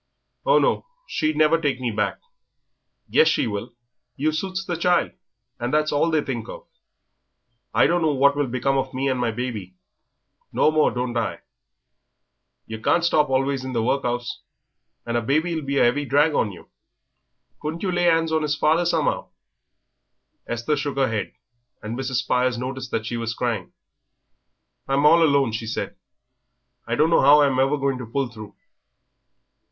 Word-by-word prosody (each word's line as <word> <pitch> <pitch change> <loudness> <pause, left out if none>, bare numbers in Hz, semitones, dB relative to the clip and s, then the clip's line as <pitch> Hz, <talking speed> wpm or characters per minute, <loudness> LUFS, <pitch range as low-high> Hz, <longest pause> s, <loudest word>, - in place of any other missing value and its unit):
"Oh, - - +6
no, - - +1 0.2
she'd 155 - -1
never 155 +2 +3
take 140 -5 0
me 125 -2 -2
back." 105 -1 -1 0.9
"Yes, 465 - +4
she - - +2
will; 115 +2 -5 0.4
you 155 +3 0
suits 185 +4 -3
the 175 - -2
child, 175 +1 +2 0.5
and 120 +1 -2
that's 155 0 +1
all 145 +3 +2
they 155 -2 +1
think 120 -4 -5
of." - - -9 1.1
"I - - +4
don't 175 +4 +2
know 160 -2 +2
what 140 +1 +4
will 145 -1 0
become 135 +2 0
of 130 0 -4
me 135 +1 0
and 130 -1 -1
my 120 -1 +1
baby." 110 -6 -5 0.8
"No 155 - +3
more 155 -1 +3
don't 125 -1 -3
I. 115 - -2 1.2
Yer 110 0 -7
can't 170 +9 +2
stop 150 -4 +3
always 135 0 0
in 130 0 -5
the 115 -2 0
work'us, 120 -1 -2 0.6
and 120 0 -1
a - - 0
baby'll 155 +7 0
be 140 0 -2
a 120 - +5
'eavy 145 +4 -2
drag 145 +3 +3
on 105 - +1
you. 90 - -14 0.9
Can't 160 +4 -4
you 190 - 0
lay 175 0 +2
'ands 165 -1 +2
on 160 -1 +1
'is 150 -1 0
father, 160 +3 +2
some'ow?" 165 -4 0 1.2
Esther 120 +6 -1
shook 140 0 -3
her 135 -3 +2
head, 110 -2 -3 0.5
and 110 +2 -4
Mrs. 130 0 -3
Spires 125 -1 +1
noticed 130 0 -5
that 110 -2 -2
she 120 +1 -3
was 115 0 -3
crying. 115 -7 -2 1.2
"I'm 140 +2 +1
all 165 +3 +6
alone," 140 -6 +3
she 115 +1 -4
said; 110 - -4 0.9
"I 115 - 0
don't 155 +5 +2
know - - +4
'ow 145 +2 +7
I'm 135 -2 +1
ever 135 +3 +2 0.2
to 125 - -7
pull 135 -1 -1
through." 110 -3 -11
135 Hz, 170 wpm, -23 LUFS, 120-155 Hz, 1.2 s, ow